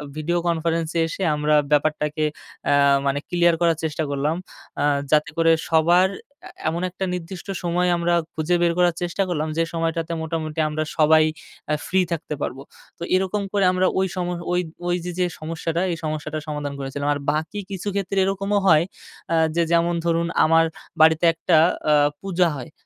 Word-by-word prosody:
Video 165 +3 -1
কনফারেন্সে 165 0 0
এসে, 175 - -6
আমরা 150 0 +2 0.2
ব্যাপারটাকে 150 +1 +1 0.5
আ - - +5 0.3
মানে 140 +1 +1
ক্লিয়ার 175 -1 +3
করার 165 -2 +3
চেষ্টা 155 0 -1
করলাম। 145 +3 0 0.5
আ - - +2 0.3
যাতে 150 0 +3
করে 165 0 +4 0.2
সবার 170 +3 +4 0.3
অ্যা - - -11 0.2
এমন 170 +2 -3
একটা 185 +1 -4
নির্দিষ্ট 180 +1 -6 0.2
সময় 180 +1 +1
আমরা 170 0 +1 0.2
খুঁজে 160 +3 0
বের 170 -1 +3
করার 175 -2 +3
চেষ্টা 175 +3 -1
করলাম, 155 -3 -1
যে 165 - +3
সময়টাতে 165 0 -2
মোটামুটি 160 -1 -4
আমরা 155 +1 -2
সবাই 155 0 +5 0.4
অ্যা 150 - +1
ফ্রি 190 0 +2
থাকতে 160 -2 -3
পারবো। 130 - -4 0.4
তো 170 - -7
এরকম 190 +2 0
করে 200 -2 +3
আমরা 185 0 +1
ওই 190 - +2
সম 180 -1 -2 0.6
ওই 175 - +2
যে, 180 - -3
যে 180 - +3
সমস্যাটা, 165 +2 -3
এই 165 - -3
সমস্যাটা 155 0 -3
সমাধান 150 -2 -4
করেছিলাম। 140 +1 -4
আর 145 - -4
বাকি 160 +7 -3
কিছু 195 +1 -6
ক্ষেত্রে 195 0 -2
এরকমও 195 +1 0
হয়। 160 -2 +6 0.5
আ - - +3 0.2
যে, 170 - +3
যেমন 170 0 +3
ধরুন 170 0 +1 0.2
আমার 165 +1 +4 0.4
বাড়িতে 160 +1 +5
একটা 165 0 +2 0.3
আ - - +6 0.3
পূজা 180 -3 +1
হয়। 125 - -8
165 Hz, 170 wpm, -22 LUFS, 155-175 Hz, 0.6 s, হয়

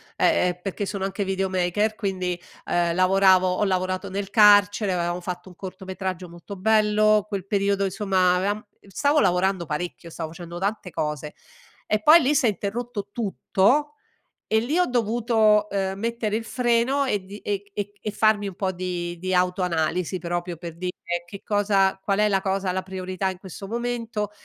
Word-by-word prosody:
ehm, - - +3
ehm, 180 - -27
perché 195 +1 -3
sono 195 -1 -4
anche 195 +1 -2
videomaker 190 +2 0
quindi, 185 -4 -2 0.3
uhm, 170 -1 +1
lavoravo 185 0 +5
ho 180 +3 0
lavorato 185 -1 -1
nel 195 +1 -4
carcere, 205 -2 +5
avevamo 175 0 -1
fatto 180 +1 -6
un 180 - -15
cortometraggio 185 -1 -6
molto 175 +4 -10
bello, 215 +1 +3
quel 200 -3 -4
periodo, 200 0 +1
insomma, 190 -2 +2
avevam 205 +3 -1 0.2
stavo 285 +9 +2
lavorando 180 - +2
parecchio, 170 +2 -5
stavo 160 -1 -5
facendo 170 0 -9
tante 200 +1 -2
cose 150 -2 -3 0.5
e 215 0 0
poi 315 +7 +8
lì 280 +2 +2
s'è 280 -4 +3
interrotto 210 +1 -3
tutto 240 +7 +1 0.5
e 220 - +3
lì 280 +9 -1
ho 360 - +4
dovuto, 225 -3 +2
uhm, 195 -1 -1
mettere 225 -1 -1
il 225 - -3
freno 245 +4 +1
e 205 -7 -1
di 200 +2 -9
e 205 -1 -3
c 205 0 -5
e 215 - -3
farmi 215 -1 +2
un 195 - -5
po' 190 0 -1
di 175 -1 -4
di 185 +1 -2
autoanalisi 180 -1 0
proprio 175 0 -3
per 170 0 -8
dire: 180 +1 -3 0.3
"Che 200 +2 -10
cosa 200 -2 +2
qual 200 +1 0
è 210 - +4
la 195 -2 +2
cosa, 195 -1 -1
la 190 +1 -1
priorità 185 0 -3
in 185 -1 -5
questo 195 +1 -9
momento." 230 -1 -3
195 Hz, 170 wpm, -24 LUFS, 180-210 Hz, 0.5 s, poi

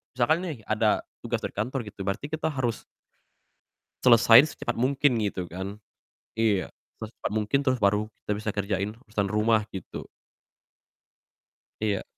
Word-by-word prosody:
misalkan 145 +7 +3
nih 155 -7 -4
ada 110 0 +2 0.2
tugas 120 0 -1
dari - - -4
kantor 125 +6 -2
gitu, 100 -1 -9
berarti 100 +8 -2
kita 160 0 -1
harus 120 -4 -2 1.2
selesain 115 +1 +8
secepat 120 - -4
mungkin, 135 +3 +2
gitu 95 -4 -2
kan. 95 +4 -6 0.6
Iya, 105 -4 +1 0.3
secepat 110 -1 -5
mungkin, 110 +6 +1
terus 130 -2 +2
baru 105 +2 +2 0.2
kita - - -2
bisa 110 +1 -3
kerjain 100 0 -1 0.2
urusan 105 -2 -1
rumah, 110 +1 +3
gitu. 95 - -7 1.8
Iya. 105 -3 0
110 Hz, 135 wpm, -27 LUFS, 100-120 Hz, 1.8 s, selesain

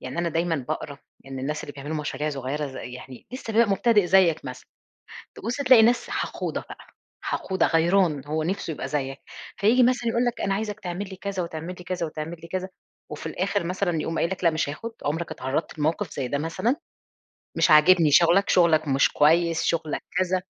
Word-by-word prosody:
يعني 130 +6 -6
أنا 170 0 +1
دايمًا 165 0 0
باقرأ 145 -2 -4 0.3
إن 135 0 -7
الناس 150 +4 -3
اللي 145 - -8
بيعملوا 145 +3 -5
مشاريع 150 0 -3
صغيرة 140 +2 -3
ز 135 - -10
يعني 125 0 -9
لسه 255 -3 -6
بيبقى 230 0 +4
مبتدئ 205 -1 +3
زيك 180 -4 +4
مثلًا، 125 0 -8 0.7
تبص 230 +4 -4
تلاقي 255 -4 +6
ناس 240 +2 +2
حقودة - - -3
بقى، - - -11 0.3
حقودة 190 -2 0
غيران 165 -3 +2
هو 155 +1 -2
نفسه 175 -1 -2
يبقى - - -5
زيك، 135 -2 -3 0.4
فييجي 230 +6 +4
مثلًا 245 -1 +2
يقول 235 +2 +1
لك 240 -1 -2
أنا 195 - 0
عايزك 210 0 -3
تعملي 190 +2 -5
كذا 190 -1 -3
وتعملي 170 +1 -6
كذا 180 -1 -3
وتعملي 160 +2 -7
كذا 185 0 -3 0.4
وفي 150 - -7
الآخر 190 +5 -1
مثلًا 175 -2 -1
يقوم 165 +1 -3
قايل 170 - +1
لك 185 - -5
لأ 170 - +6
مش 155 -3 -1
هاخد. 225 +11 -6
عمرك 165 +3 -2
اتعرضت 135 +4 -3
لموقف 160 +4 -1
زي 135 -3 -3
ده 140 - -1
مثلًا؟ 185 - -1 0.8
مش - - +3
عاجبني 155 +1 +6
شغلك، 175 +6 +5
شغلك 165 -4 +4
مش 135 0 +3
كويس، 165 +2 +3
شغلك 160 -2 -1 0.2
كذا. 185 0 +1
170 Hz, 185 wpm, -25 LUFS, 150-195 Hz, 0.8 s, تلاقي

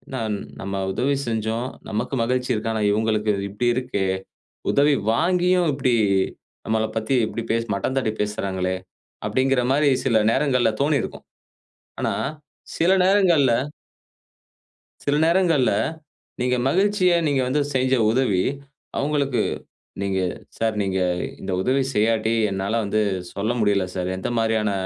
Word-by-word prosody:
"நாம் 110 -4 -1 0.3
நம்ப 100 0 -3
உதவி 140 +6 +1
செஞ்சோம். 115 +2 -2 0.2
நமக்கு 115 +6 -2
மகிழ்ச்சி 125 +2 0
இருக்கு, 115 0 -2
ஆனா 110 -1 -1
இவங்களுக்கு 110 0 +1 0.2
இப்டி 105 +5 -2
இருக்கே. 125 -6 -1 0.7
உதவி 145 +1 +4 0.2
வாங்கியும் 180 +4 +2
இப்டி 130 -3 +1 0.7
நம்பள 110 0 0
பத்தி 110 +4 0
இப்டி 115 - -4
பேசு 115 +1 +1
மட்டம் 100 +7 -2
தட்டிப் 110 -5 -1
பேசுறாங்களே, 95 -3 -1 0.5
அப்படீங்கிற 130 -1 +2
மாரி 145 +1 +3
சில 115 -5 +3
நேரங்கள்ல 130 -4 +2
தோணிருக்கும்." 145 0 -1 0.7
ஆனா - - 0 0.6
சில 170 +3 +3
நேரங்கள்ல 180 -9 +4 1.5
சில 145 - +1
நேரங்கள்ல, 165 -6 +3 0.7
நீங்க 125 0 +2
மகிழ்ச்சிய 190 +3 +3
நீங்க 140 -2 +2
வந்து 145 +3 +1
செஞ்ச 130 0 +2 0.2
உதவி. 110 -7 +2 0.5
அவங்களுக்கு 140 -2 0 0.6
நீங்க 95 -1 0 0.4
"சார், 110 -1 0
நீங்க 95 -1 -1 0.4
இந்த 95 - -4
உதவி 130 +6 +2
செய்யாட்டி 110 +1 +2 0.2
என்னால 95 +2 -2
வந்து 105 +1 0 0.3
சொல்ல 105 +3 -1
முடியல 100 -3 +2
சார் 90 -1 -2
எந்த 95 - -3
மாதிரியான 110 -2 +1
120 Hz, 125 wpm, -23 LUFS, 105-140 Hz, 1.5 s, உதவி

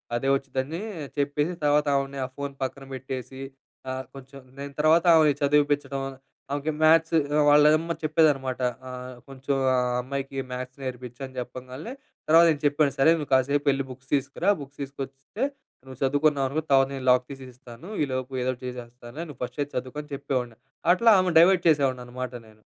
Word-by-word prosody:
అదే 135 +3 -1
వచ్చుద్దని 135 +5 -3 0.4
చెప్పేసి, 145 +4 0
తర్వాత 150 +1 +3
ఆమెని 135 0 -3
ఆ - - -5
ఫోన్ 140 -1 -4
పక్కన 135 +1 -4
పెట్టేసి, 130 +1 -6 0.5
ఆ - - -2 0.2
కొంచెం 135 +1 -11 0.2
నేను 140 0 -7
తర్వాత 160 +3 +4
ఆమెని 155 -2 +5
చదివిపిచ్చడం. 145 -1 +1 0.5
ఆమెకి 145 +2 -1
మ్యాథ్స్ 165 +1 +5 0.3
వాళ్ళమ్మ 150 +3 +5
చెప్పేదన్నమాట 145 -5 +2 0.3
ఆ! - - -6 0.4
కొంచెం 135 +1 -3 0.2
ఆ - - +3 0.3
"అమ్మాయికి 135 +1 -5
మ్యాథ్స్ 130 +1 -6
నేర్పించు" 125 -1 -7
అని 130 -1 -13
చెప్పంగాల్నే, 130 - -7 0.3
తర్వాత 165 +2 +7
నేను 150 - -3
చెప్పాను, 145 0 +3
సరే 150 +4 +6
నువ్వు 150 - -5
కాసేపు 140 +2 +2
వెళ్లి 135 0 +1
బుక్స్ 130 +1 -12
తీసుకురా, 140 +7 0
బుక్స్ 140 +1 -12
తీసుకొస్తే 140 - -6 0.4
నువ్వు 130 -1 -11
చదువుకున్నావనుకో, 145 +1 +1
తర్వాత 135 -1 +5
నేను 130 -1 -6
లాక్ 125 0 +3
తీసి 135 -1 -9
ఇస్తాను. 125 - -12 0.2
ఈలోపు 130 0 -4
ఏదో 130 - +1
ఒకటి 125 0 -11
చేసేస్తానులే. 125 +4 -8
నువ్వు 145 - -11
ఫస్ట్ 135 - -6
అయితే 145 0 -3
చదువుకో 130 +4 -5
అని 150 - -20
చెప్పేవాడిని. 125 -4 -3 0.4
అట్లా 230 +4 +5
ఆమెను 180 -3 +2
డైవర్ట్ 180 +1 +5
చేసేవాడినన్నమాట 130 -3 -1
నేను. 110 0 -20
135 Hz, 160 wpm, -26 LUFS, 130-150 Hz, 0.5 s, తర్వాత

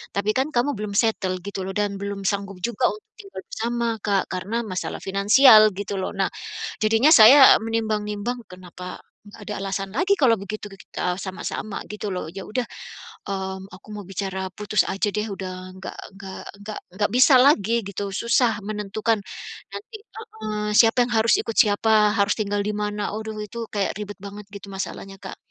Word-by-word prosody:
tapi 205 +2 +1
kan 265 +2 +1
kamu 270 +2 +1
belum 210 -1 -4
settle." 195 -4 +1
Gitu 200 -1 -5
loh 190 0 -5
dan 205 -1 -1
belum 200 0 -5
sanggup 200 -1 -2
juga 240 +1 +1
untuk 425 - -12 0.2
tinggal 395 -2 -9
bersama 240 - -2
Kak, 195 -2 +1
karena 195 +6 -2
masalah 185 -3 -4
finansial 215 +3 +7
gitu 200 0 -4
loh. 185 - -3
Nah, 195 -1 +1 0.5
jadinya 225 +7 +4
saya 265 +2 +9
menimbang-nimbang, 220 +1 -2
"Kenapa, 180 0 -9 0.3
enggak 205 +1 -13
ada 210 - -4
alasan 195 0 -3
lagi 375 +9 +2
kalau 250 -6 +4
begitu 205 +2 -6
ke 195 - -12
kita 180 -1 -3
sama-sama 195 +2 -5
gitu 210 -1 -5
loh, 180 -3 -4
ya 195 0 -7
udah, 250 +4 -1 0.7
mmm, 190 -1 -4
aku 185 - -16
mau 205 -1 -7
bicara 190 0 -4
putus 210 0 +1
aja 200 +2 0
deh, 210 +1 -2
udah 185 -1 -7
enggak 190 - -8 0.2
enggak 195 -1 -9 0.2
enggak 210 +1 -6 0.2
enggak 205 +1 0
bisa 260 +2 +7
lagi 240 -6 +4
gitu, 200 0 -4
susah 235 0 +2
menentukan 215 +1 -1 0.5
nanti" 435 +2 -8 0.2
heeh, 215 - -5
siapa 230 +2 +6
yang 240 - -6
harus 225 0 +4
ikut 225 - -5
siapa, 210 0 +4
harus 200 0 +3
tinggal 205 -1 -1
di 210 - -1
mana? 210 0 -2
Aduh, 220 0 -6
itu 230 +3 -6
kayak 200 -1 -1
ribet 205 -1 -7
banget 205 +1 -8
gitu 200 0 -9
masalahnya 195 0 -6
Kak. - - -8
210 Hz, 175 wpm, -23 LUFS, 195-225 Hz, 0.7 s, saya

